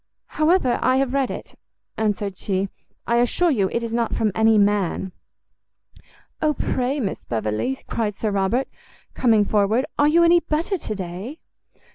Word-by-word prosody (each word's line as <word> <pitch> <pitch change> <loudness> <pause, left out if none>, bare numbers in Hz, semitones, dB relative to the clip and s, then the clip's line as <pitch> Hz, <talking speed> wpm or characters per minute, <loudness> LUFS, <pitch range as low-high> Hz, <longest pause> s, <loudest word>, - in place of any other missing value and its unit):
"However, 310 -6 +3
I 255 +1 +3
have 265 -1 0
read 275 -2 +1
it," - - -7 0.4
answered 205 -2 -1
she, 190 0 -2 0.4
"I 235 - +1
assure 280 +8 +2
you 200 -8 +1
it 235 - -1
is 230 -1 -4
not 235 -1 0
from 220 -2 +1
any 220 +1 +4
man." 200 -2 +1 1.3
"O 305 -1 +2
pray, 260 +3 -1
Miss 205 -7 -3
Beverley," 110 - -2
cried 210 -3 -2
Sir 215 0 -2
Robert, 200 +7 0 0.5
coming 220 -4 +3
forward, 215 +5 +2
"are 290 - +5
you 335 +3 +4
any 340 +1 +6
better 330 +4 -1
to 215 - -4
day?" 190 - -6
230 Hz, 155 wpm, -22 LUFS, 200-270 Hz, 1.3 s, any